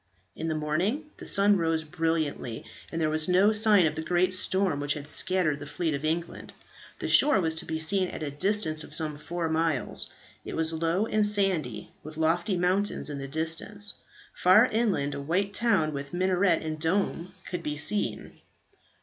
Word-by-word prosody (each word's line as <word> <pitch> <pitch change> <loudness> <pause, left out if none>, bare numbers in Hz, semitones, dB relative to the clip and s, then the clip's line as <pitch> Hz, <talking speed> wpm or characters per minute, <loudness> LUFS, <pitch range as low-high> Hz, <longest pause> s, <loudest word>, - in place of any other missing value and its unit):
In 160 - -5
the 160 - -1
morning 185 - -2
the - - -8
sun 200 0 +4
rose 165 -2 0
brilliantly, 155 -7 -3 0.3
and 165 - -3
there 160 - +1
was 155 0 +2
no 190 +4 +4
sign 210 -4 +4
of 155 - 0
the 160 - -5
great 180 +3 +1
storm 185 -4 +2
which 145 0 -1
had 145 -1 -8
scattered 165 -2 +1
the 145 - -9
fleet 155 +2 -2
of 140 +1 -4
England. 165 +2 -3 0.4
The - - -4
shore 295 -8 +6
was 160 -3 0
to - - -13
be 160 0 -4
seen 185 +4 +3
at 160 - -7
a 145 - -4
distance 155 0 +1
of 150 - -3
some 155 -2 0
four 170 +2 -4
miles, 160 -4 0 0.3
It - - -7
was 160 0 +1
low 165 +5 0
and 215 -1 +1
sandy, 180 - +1
with 155 +1 -11
lofty 175 +5 0
mountains 180 -2 0
in 140 - -5
the 135 - -6
distance. 165 +7 -2 0.4
Far 185 +6 +5
inland 205 - 0
a 140 - -5
white 185 +7 -1
town 195 -10 +1
with 140 +3 -6
minaret 185 -2 +1
and 155 -1 -5
dome 180 +1 -1
could 180 - -5
be 150 0 -4
seen. 200 +8 -2
165 Hz, 185 wpm, -27 LUFS, 155-195 Hz, 0.4 s, shore